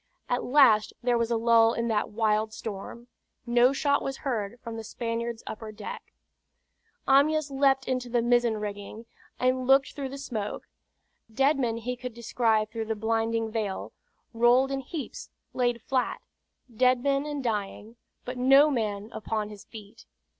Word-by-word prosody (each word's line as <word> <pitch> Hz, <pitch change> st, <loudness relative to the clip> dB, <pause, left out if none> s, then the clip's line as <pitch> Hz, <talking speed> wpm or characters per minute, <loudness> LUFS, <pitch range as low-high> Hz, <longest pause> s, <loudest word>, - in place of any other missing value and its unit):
At 245 Hz, -, -1 dB
last 250 Hz, -6 st, +4 dB
there 245 Hz, 0 st, +2 dB
was 230 Hz, 0 st, 0 dB
a 235 Hz, -, +1 dB
lull 230 Hz, 0 st, +4 dB
in 235 Hz, 0 st, -1 dB
that 210 Hz, -2 st, 0 dB
wild 215 Hz, 0 st, 0 dB
storm. 220 Hz, +3 st, -7 dB, 0.4 s
No 240 Hz, +1 st, +4 dB
shot 280 Hz, +1 st, +1 dB
was 270 Hz, 0 st, -4 dB
heard 235 Hz, -3 st, -2 dB
from 230 Hz, -1 st, -7 dB
the 225 Hz, -, -6 dB
Spaniard's 230 Hz, 0 st, -4 dB
upper 220 Hz, 0 st, -7 dB
deck. 470 Hz, -, -8 dB, 1.0 s
Amyas 290 Hz, +2 st, +3 dB
leaped 270 Hz, -1 st, +2 dB
into 255 Hz, -1 st, -2 dB
the 240 Hz, -1 st, +1 dB
mizzen 240 Hz, -2 st, +2 dB
rigging, 210 Hz, +2 st, -6 dB, 0.3 s
and 255 Hz, 0 st, +1 dB
looked 270 Hz, 0 st, +4 dB
through 275 Hz, -2 st, -5 dB
the 275 Hz, -, -7 dB
smoke. 220 Hz, -7 st, -4 dB, 0.7 s
Dead 275 Hz, +5 st, +2 dB
men 230 Hz, -3 st, 0 dB
he 245 Hz, +2 st, -4 dB
could 250 Hz, -1 st, -7 dB
descry 225 Hz, -2 st, +1 dB
through 220 Hz, +1 st, -5 dB
the 220 Hz, 0 st, -2 dB
blinding 225 Hz, +1 st, -1 dB
veil, 215 Hz, -4 st, -3 dB, 0.4 s
rolled 240 Hz, +3 st, +4 dB
in 270 Hz, -, -1 dB
heaps, 290 Hz, +2 st, -7 dB, 0.2 s
laid 240 Hz, -2 st, 0 dB
flat; 260 Hz, -2 st, -1 dB, 0.6 s
dead 255 Hz, +1 st, +3 dB
men 280 Hz, +1 st, +1 dB
and 290 Hz, -2 st, -4 dB
dying; 215 Hz, 0 st, -3 dB, 0.3 s
but 250 Hz, 0 st, -5 dB
no 275 Hz, +4 st, +6 dB
man 215 Hz, -3 st, -2 dB
upon 215 Hz, -1 st, -3 dB
his 210 Hz, -2 st, -12 dB
feet. 210 Hz, -2 st, -13 dB
235 Hz, 160 wpm, -27 LUFS, 220-260 Hz, 1.0 s, no